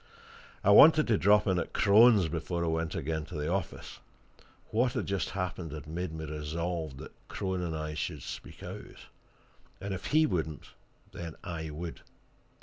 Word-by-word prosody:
I - - +5
wanted 155 -1 +8
to 110 - +4
drop 105 +2 +5
in 95 -3 +2
at - - -4
Crone's 105 -2 +6
before 85 +2 -2
I - - 0
went 80 0 -1
again 80 +1 -2
to 80 - -9
the 75 +3 -1
office: 95 - -4 0.7
what 120 +2 +2
had - - -2
just 100 -3 -1
happened, 90 -4 -4
had 75 -3 -7
made 85 +2 -4
me 80 0 -6
resolved 80 0 -4
that - - -10
Crone 95 -2 -3
and 80 -3 -3
I 75 0 -4
should 75 -1 -4
speak - - -8
out; - - -9 0.7
and 100 0 -4
if 95 - -5
he 155 +1 +4
wouldn't, 80 - -3 0.4
then 85 -2 -7
I 85 -4 -5
would. 80 +2 -6
85 Hz, 170 wpm, -30 LUFS, 80-95 Hz, 0.7 s, wanted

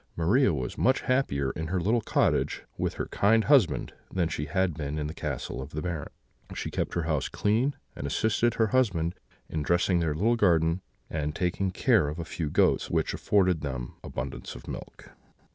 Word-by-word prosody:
Maria 100 +8 +3
was 65 -5 -3
much 130 +2 +3
happier 70 - +1
in 80 0 -4
her 90 +2 0
little 110 +7 +2
cottage - - +1
with - - -2
her - - -2
kind 110 +2 +3
husband 135 - +3 0.2
than 90 -3 +1
she 75 -2 -3
had 90 +3 +1
been 75 0 -4
in 75 - -2
the 75 - -4
castle 70 -6 -4
of 65 - -7
the 75 - -3
Baron. 85 -5 -3 0.5
She - - -4
kept - - -2
her 85 - 0
house 80 -4 0
clean, 115 +7 +1 0.2
and 70 - -4
assisted 110 - +1
her 110 -2 +2
husband 90 -10 +2 0.3
in 80 - -3
dressing 85 +3 +2
their 80 -3 0
little 110 +9 +2
garden 85 -3 +3 0.3
and 75 -1 -3
taking 90 +2 0
care 100 - +3
of 75 +2 -4
a 85 - -4
few 80 -1 -3
goats, - - +2
which - - 0
afforded 95 -5 +2
them 65 -4 -4
abundance 65 0 -5
of - - -11
milk. - - -8
85 Hz, 190 wpm, -28 LUFS, 75-105 Hz, 0.5 s, Maria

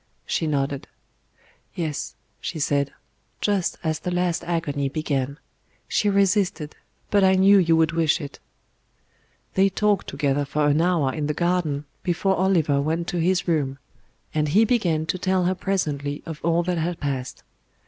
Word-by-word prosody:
She 160 - -1
nodded. 140 -2 -1 0.9
"Yes," 155 -4 -3 0.2
she 170 - -5
said; 140 -1 0 0.5
"just 200 -4 0
as 155 -1 -1
the - - -4
last 180 -1 0
agony 145 -5 -1
began. 140 -2 -2 0.5
She 210 - +1
resisted, 195 -6 +1 0.4
but 200 -1 +4
I 190 0 +5
knew 195 +1 +6
you 165 -3 +3
would 160 -1 +3
wish 165 0 +2
it." 145 -3 -8 1.1
They 195 +1 +4
talked 205 +1 +1
together 145 0 0
for 145 +2 0
an 145 +2 +3
hour 165 -7 +2
in 150 -2 -2
the 150 - -1
garden 170 -5 0 0.2
before 190 +2 +1
Oliver 165 -7 +2
went 165 +3 -1
to 175 - -2
his 180 +2 +1
room; 145 -5 0 0.6
and 150 -1 +1
he 205 +10 +4
began 175 -10 +1
to 180 +3 -2
tell 185 0 +1
her 185 - +2
presently 150 -7 -2
of 160 -3 -6
all 170 +1 +2
that 180 -1 -1
had 170 +1 -2
passed. 130 -3 -4
165 Hz, 160 wpm, -24 LUFS, 145-185 Hz, 1.1 s, knew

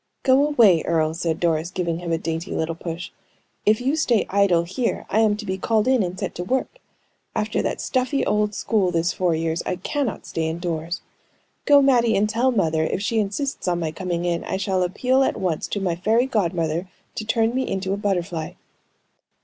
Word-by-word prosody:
"Go 270 +2 +4
away, 220 - +5
Earle!" 160 -1 +1
said 165 -1 -2
Doris, 165 -1 +1
giving 170 -2 -2
him 175 -1 -4
a 165 - +2
dainty 165 +2 -4
little 160 +1 -1
push. 170 +1 -6 0.6
"If 215 0 +5
you 265 +4 0
stay 245 -9 +2
idle 195 -4 +3
here, 190 +8 -2
I 215 - +3
am 215 -2 +3
to 215 - -7
be 190 -1 -3
called 220 +3 +1
in 260 -3 +4
and 180 -1 -3
set - - -3
to 175 - -4
work. 265 - -2 0.6
After 215 0 0
that - - -2
stuffy 260 +2 0
old 210 -1 +1
school 205 -5 +1
this 170 0 0
four 180 -3 +1
years, 165 +1 -1
I - - -2
cannot 245 +6 -3
stay 160 -1 -2
indoors. 165 0 -3 0.6
Go, 285 -1 +6
Mattie, 240 -4 +4
and 205 +2 +2
tell 235 +4 +1
mother 160 -9 +1
if 160 - -1
she 225 +2 +1
insists 215 +5 -2
on 175 -1 +1
my 160 -2 -2
coming 175 0 -3
in, 170 -1 -1
I - - -2
shall 190 -1 0
appeal 250 +9 +1
at 270 - +1
once 175 -5 -1
to 205 - -3
my 180 -3 -1
fairy 220 +8 +2
godmother 175 -7 -1 0.3
to - - -4
turn 225 +1 +1
me 260 +1 -1
into 190 0 -1
a - - -1
butterfly." 175 -5 -2
190 Hz, 200 wpm, -23 LUFS, 170-225 Hz, 0.6 s, Go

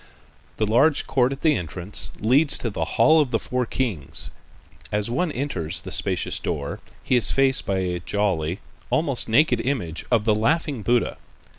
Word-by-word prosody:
The 110 - +1
large 135 +8 +3
court 130 -1 +1
at 135 +1 -6
the 155 -2 +3
entrance 90 +2 -1
leads 140 +7 +4
to 115 - -3
the - - -2
"Hall 160 0 +6
of 145 - -1
the 115 - +1
Four 125 +2 -3
Kings." 105 - -3 0.6
As 105 +2 -1
one 165 +6 0
enters 85 - -3
the - - -8
spacious - - -1
door, 70 -1 -4 0.2
he 130 - +1
is 115 -6 +3
faced 135 0 +3
by 95 - 0
a 90 -1 -2
jolly, 90 -2 -1 0.3
almost 140 -8 +1
naked 125 0 +3
image 110 - -3
of 115 -4 +2
the 110 - +4
"Laughing 140 +4 0
Buddha." 120 +2 0
115 Hz, 170 wpm, -23 LUFS, 100-135 Hz, 0.6 s, Hall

